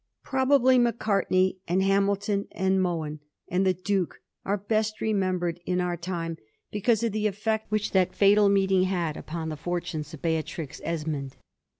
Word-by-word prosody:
Probably 260 Hz, -1 st, +4 dB
Mac 235 Hz, -1 st, +2 dB
artney, 190 Hz, -3 st, +1 dB
and 185 Hz, +3 st, +2 dB
Hamilton, 200 Hz, +1 st, +1 dB
and 190 Hz, 0 st, +1 dB
Mohun, 160 Hz, -4 st, -2 dB, 0.3 s
and 185 Hz, +2 st, +1 dB
the 185 Hz, -, +3 dB
Duke 185 Hz, 0 st, -1 dB, 0.3 s
«ure 200 Hz, +1 st, +1 dB
best 215 Hz, +1 st, -1 dB
remembered 185 Hz, -5 st, 0 dB
in 180 Hz, 0 st, +1 dB
our 180 Hz, -1 st, 0 dB
time 170 Hz, -1 st, -4 dB, 0.3 s
because 220 Hz, +2 st, +1 dB
of 230 Hz, -, +1 dB
the 215 Hz, +1 st, 0 dB
effect 220 Hz, +2 st, -2 dB
which 215 Hz, -1 st, -1 dB
that 185 Hz, -2 st, +2 dB
fatal 205 Hz, 0 st, +5 dB
meeting 190 Hz, -1 st, +3 dB
had 175 Hz, -5 st, -1 dB
upon 160 Hz, 0 st, -5 dB
the 155 Hz, -, -4 dB
fortunes 160 Hz, -2 st, -4 dB
of 160 Hz, -, -11 dB
Seatrix 160 Hz, -2 st, -3 dB
Esmond. 150 Hz, -5 st, -3 dB
190 Hz, 160 wpm, -27 LUFS, 170-210 Hz, 0.3 s, fatal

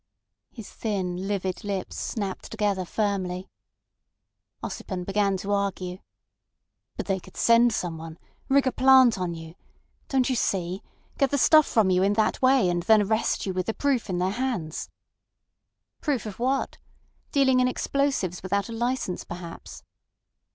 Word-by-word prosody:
His 225 Hz, -5 st, -10 dB
thin 190 Hz, -4 st, -3 dB
livid 190 Hz, -3 st, -2 dB
lips 200 Hz, -2 st, -4 dB
snapped 200 Hz, -4 st, -4 dB
together 205 Hz, -4 st, -1 dB
firmly. 190 Hz, -2 st, -2 dB, 1.1 s
Ossipon 185 Hz, -3 st, -5 dB
began 195 Hz, 0 st, +1 dB
to 200 Hz, +2 st, -4 dB
argue. 190 Hz, -2 st, -2 dB, 1.0 s
"But -, -, -3 dB
they 195 Hz, -1 st, 0 dB
could 185 Hz, -, -16 dB
send 235 Hz, +1 st, +5 dB
someone—rig 170 Hz, +10 st, -2 dB
a 260 Hz, -, +2 dB
plant 260 Hz, -5 st, +6 dB
on 175 Hz, -2 st, -2 dB
you. 160 Hz, 0 st, -9 dB, 0.5 s
Don't 265 Hz, -2 st, +1 dB
you 260 Hz, -, +1 dB
see? 185 Hz, -4 st, -1 dB, 0.4 s
Get 275 Hz, -2 st, +3 dB
the 285 Hz, -, 0 dB
stuff 310 Hz, +2 st, +6 dB
from 215 Hz, -5 st, +3 dB
you 180 Hz, 0 st, +3 dB
in 200 Hz, +2 st, +3 dB
that 215 Hz, 0 st, +1 dB
way, 260 Hz, -5 st, +4 dB
and 175 Hz, -1 st, 0 dB
then 215 Hz, +3 st, +5 dB
arrest 220 Hz, +2 st, 0 dB
you 190 Hz, -, -2 dB
with 185 Hz, 0 st, -2 dB
the 225 Hz, -, -1 dB
proof 270 Hz, -6 st, 0 dB
in 180 Hz, -, -1 dB
their 180 Hz, +2 st, 0 dB
hands." 210 Hz, -10 st, -3 dB, 1.1 s
"Proof 280 Hz, -7 st, -1 dB
of 210 Hz, -1 st, -7 dB
what? 265 Hz, +3 st, -1 dB, 0.5 s
Dealing 265 Hz, -2 st, +4 dB
in 250 Hz, -, +4 dB
explosives 255 Hz, -9 st, -1 dB
without 200 Hz, +3 st, -1 dB
a -, -, -5 dB
licence 240 Hz, -5 st, -2 dB
perhaps." 170 Hz, -1 st, -9 dB
200 Hz, 150 wpm, -26 LUFS, 185-245 Hz, 1.1 s, plant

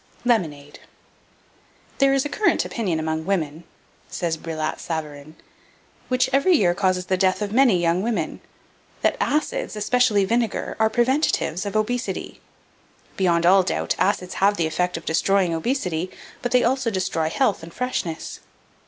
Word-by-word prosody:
LEMONADE 150 Hz, -, -1 dB, 1.2 s
"There 275 Hz, 0 st, +5 dB
is 270 Hz, +1 st, +1 dB
a -, -, -2 dB
current 425 Hz, -, +1 dB
opinion 185 Hz, -9 st, -2 dB
among 160 Hz, 0 st, -2 dB
women" 165 Hz, -4 st, -2 dB, 0.4 s
says 170 Hz, -2 st, -2 dB
Brillat 155 Hz, -1 st, -4 dB
Savarin 155 Hz, -2 st, -6 dB, 0.7 s
"which 255 Hz, 0 st, +2 dB
every 310 Hz, +7 st, +4 dB
year 180 Hz, -, +3 dB
causes 185 Hz, 0 st, 0 dB
the 185 Hz, +1 st, 0 dB
death 185 Hz, 0 st, +2 dB
of 205 Hz, -1 st, -3 dB
many 245 Hz, -7 st, +4 dB
young 170 Hz, +1 st, +1 dB
women, 210 Hz, -7 st, -2 dB, 0.6 s
that -, -, +3 dB
acids, 310 Hz, -, -1 dB
especially 210 Hz, -1 st, +2 dB
vinegar, 230 Hz, +1 st, -1 dB
are 220 Hz, 0 st, +4 dB
preventives 240 Hz, -, +1 dB
of 200 Hz, -, -5 dB
obesity. 215 Hz, -2 st, -2 dB, 0.7 s
Beyond 170 Hz, -3 st, +2 dB
all 190 Hz, +2 st, +6 dB
doubt, 185 Hz, -, -1 dB
acids 185 Hz, -1 st, 0 dB
have 205 Hz, +1 st, +4 dB
the 165 Hz, -, +1 dB
effect 180 Hz, +3 st, -1 dB
of 165 Hz, -, -10 dB
destroying 180 Hz, +2 st, +2 dB
obesity; 180 Hz, -, -1 dB, 0.3 s
but 245 Hz, -, -2 dB
they 250 Hz, 0 st, +4 dB
also 260 Hz, 0 st, +1 dB
destroy 185 Hz, -5 st, -1 dB
health 215 Hz, +1 st, +1 dB
and 165 Hz, +1 st, -10 dB
freshness. 175 Hz, -9 st, -4 dB
190 Hz, 145 wpm, -23 LUFS, 165-240 Hz, 1.2 s, all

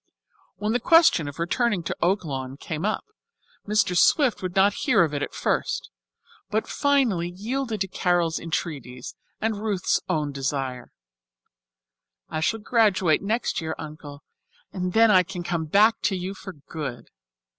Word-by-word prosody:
When 210 Hz, +3 st, -2 dB
the 245 Hz, -, +2 dB
question 305 Hz, -, +5 dB
of 145 Hz, -, -7 dB
returning 185 Hz, +3 st, 0 dB
to -, -, -3 dB
Oaklawn 145 Hz, -8 st, -1 dB
came 160 Hz, +3 st, -4 dB
up, 215 Hz, -, -1 dB, 0.6 s
Mr. 205 Hz, -3 st, +2 dB
Swift 270 Hz, -, +4 dB
would 185 Hz, -1 st, -4 dB
not 195 Hz, +1 st, +4 dB
hear 220 Hz, -8 st, +3 dB
of 155 Hz, -3 st, -1 dB
it 145 Hz, -, -2 dB
at -, -, -4 dB
first, -, -, -1 dB, 0.6 s
but 220 Hz, +1 st, 0 dB
finally 255 Hz, -, +1 dB
yielded 220 Hz, +4 st, -3 dB
to 195 Hz, -, +1 dB
Carol's 175 Hz, -3 st, 0 dB
entreaties 140 Hz, -7 st, -5 dB, 0.3 s
and 215 Hz, -1 st, -1 dB
Ruth's 205 Hz, -4 st, 0 dB
own 150 Hz, -2 st, 0 dB
desire. 135 Hz, -2 st, -3 dB, 1.4 s
"I 155 Hz, -, -3 dB
shall 225 Hz, +7 st, 0 dB
graduate 205 Hz, -8 st, +3 dB
next 220 Hz, +1 st, -1 dB
year, 160 Hz, 0 st, -3 dB
Uncle, 150 Hz, -2 st, -9 dB, 0.5 s
and 180 Hz, -1 st, -3 dB
then 225 Hz, -1 st, +6 dB
I 185 Hz, -2 st, +7 dB
can 180 Hz, -1 st, -6 dB
come 170 Hz, -2 st, -2 dB
back 210 Hz, +8 st, +4 dB
to 200 Hz, -, +2 dB
you 185 Hz, +1 st, -4 dB
for 190 Hz, -1 st, -9 dB
good." 145 Hz, -4 st, -7 dB
180 Hz, 150 wpm, -25 LUFS, 155-215 Hz, 1.4 s, I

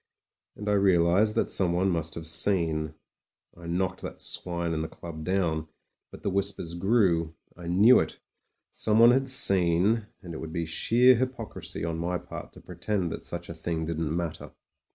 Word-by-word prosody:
And 105 Hz, -, -8 dB
I -, -, +1 dB
realised 95 Hz, +1 st, +3 dB
that -, -, 0 dB
someone 95 Hz, 0 st, +1 dB
must 80 Hz, -1 st, -2 dB
have 80 Hz, -, -6 dB
seen. 80 Hz, -3 st, +1 dB, 0.6 s
I 85 Hz, 0 st, -11 dB
knocked 95 Hz, +2 st, -2 dB
that -, -, -8 dB
swine 85 Hz, -1 st, -3 dB
in 80 Hz, -, -2 dB
the 80 Hz, -, -3 dB
club 80 Hz, -2 st, -9 dB
down; 80 Hz, -4 st, -1 dB, 0.4 s
but -, -, -14 dB
the 100 Hz, -, -1 dB
whis 100 Hz, +1 st, 0 dB
pers 85 Hz, -4 st, -8 dB
grew. 85 Hz, -4 st, +1 dB, 0.2 s
I 85 Hz, -1 st, -10 dB
knew 100 Hz, +9 st, +5 dB
it. -, -, -4 dB, 0.5 s
Someone 115 Hz, +2 st, +4 dB
had 135 Hz, +1 st, +1 dB
seen, 100 Hz, -1 st, +5 dB, 0.2 s
and 85 Hz, -2 st, -8 dB
it 80 Hz, -, -7 dB
would 80 Hz, -, -7 dB
be 85 Hz, -1 st, -2 dB
sheer 120 Hz, +10 st, +4 dB
hypocrisy 115 Hz, -10 st, -4 dB
on 80 Hz, 0 st, -3 dB
my 90 Hz, +2 st, -2 dB
part -, -, -10 dB
to -, -, -15 dB
pretend 95 Hz, -6 st, -3 dB
that -, -, -7 dB
such 85 Hz, 0 st, -5 dB
a -, -, -7 dB
thing 80 Hz, 0 st, -4 dB
didn't 80 Hz, 0 st, -3 dB
matter. 85 Hz, -2 st, -5 dB
85 Hz, 175 wpm, -27 LUFS, 85-100 Hz, 0.6 s, knew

